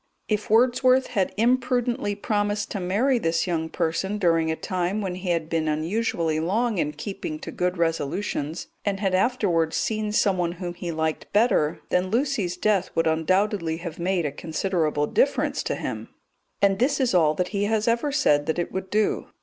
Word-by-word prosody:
If 210 -1 -1
Wordsworth 255 +3 +4
had 190 -2 +1
imprudently 245 -2 +1
promised 205 0 -1
to 200 - -2
marry 220 +9 +1
this 165 -4 0
young 165 -3 -2
person 175 +5 -1
during 165 -4 +2
a 160 - 0
time 185 +4 -2
when 190 -3 -2
he 185 0 -5
had 165 -2 0
been 160 -1 -1
unusually 160 0 0
long 210 +5 0
in 150 -1 0
keeping 195 -6 -5
to - - -8
good 180 0 -1
resolutions, 165 -1 -2 0.2
and 200 -1 -1
had 195 -2 0
afterwards 185 -6 +1
seen 215 -1 -1
someone 185 -5 +1
whom 175 0 -5
he 175 -1 -5
liked 160 -1 -2
better, 205 -8 +2
then 180 +1 +1
Lucy's 225 -7 0
death 195 -1 +1
would 165 - +2
undoubtedly 165 +1 +1
have 170 -1 -7
made 175 -1 0
a 145 - -1
considerable 160 -1 -1
difference - - +1
to - - -2
him, - - -5 0.5
and 195 -1 +4
this 275 +4 +2
is 255 -5 +1
all 155 -4 +4
that 180 +2 -1
he 200 0 -1
has 220 +1 0
ever 235 +5 +1
said 150 - +2
that 160 - 0
it 175 - -2
would 190 0 -4
do. 210 +1 0
185 Hz, 180 wpm, -25 LUFS, 165-215 Hz, 0.5 s, Wordsworth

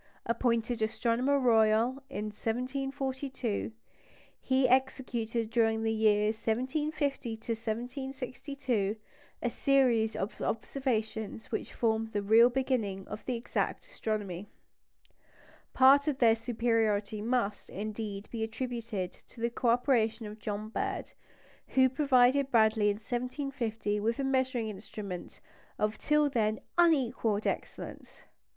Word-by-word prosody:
Appointed 230 0 0
Astronomer 235 +5 +1
Royal 230 +1 +3
in 215 -6 -4
1742, 260 0 -3 0.7
he 260 0 +3
executed 240 -3 0
during 225 -1 +2
the 225 0 +1
years 215 0 +3
1750 250 -2 -2
62 255 -5 -2 0.5
a - - +2
series 250 -6 +3
of 200 - -4
observations 225 -4 -2
which 220 - -3
formed 225 -1 0
the 205 -1 -1
real 225 +4 +7
beginning 240 -7 -1
of 210 - -6
exact 240 -1 -2
astronomy. 210 - -4 1.2
Part 275 +2 +6
of 290 -3 +1
their 230 -4 +6
superiority 220 -3 0
must, 220 -3 -1
indeed, 210 0 -5
be 230 - -4
attributed 225 -4 -3
to - - -18
the 235 +1 0
co 235 0 0
operation 235 -2 +2
of 210 +1 -8
John 210 0 -4
Bird, - - -3 0.5
who 260 0 +4
provided 265 0 +3
Bradley 220 -3 +4
in 205 - +1
1750 240 -2 -3
with 230 +3 0
a 275 - -1
measuring 260 -3 +1
instrument 200 -2 -7 0.4
of 210 +1 -1
till 300 -1 +3
then 220 -5 0 0.2
unequalled 255 -10 +2
excellence. - - -5
230 Hz, 110 wpm, -30 LUFS, 215-260 Hz, 1.2 s, real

